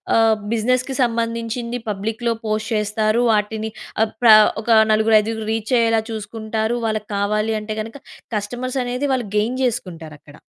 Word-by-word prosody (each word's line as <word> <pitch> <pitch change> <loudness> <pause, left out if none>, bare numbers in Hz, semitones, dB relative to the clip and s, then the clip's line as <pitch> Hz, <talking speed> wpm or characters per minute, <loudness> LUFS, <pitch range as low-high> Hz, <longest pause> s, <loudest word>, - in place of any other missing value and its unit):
ఆహ్, 225 -1 +4 0.2
బిజినెస్‌కి 255 +4 0
సంబంధించింది 230 0 -2
పబ్లిక్‌లో 220 +3 -2
పోస్ట్ 215 +1 -2
చేస్తారు. 215 +2 +1
వాటిని 215 +1 -1 0.3
ఆహ్, 220 - -2
ప్ర 235 - +7 0.3
ఒక 235 - -7 0.2
నలుగురు 220 +1 +3
ఐదుగురు 220 0 -4
రీచ్ 225 +2 -3
అయ్యేలా 225 -1 +2
చూసుకుంటారు. 220 +1 -3
వాళ్ళకి 215 -1 -3
కావాలి 210 +2 0
అంటే 215 0 -5
గనక 225 +5 -8 0.4
కస్టమర్స్ 245 +6 -3
అనేది 250 +3 -2
వాళ్ళు 245 -4 -1
గెయిన్ 235 +5 0
చేసుకుంటారక్కడ. 165 - -5
220 Hz, 135 wpm, -20 LUFS, 215-235 Hz, 0.4 s, ప్ర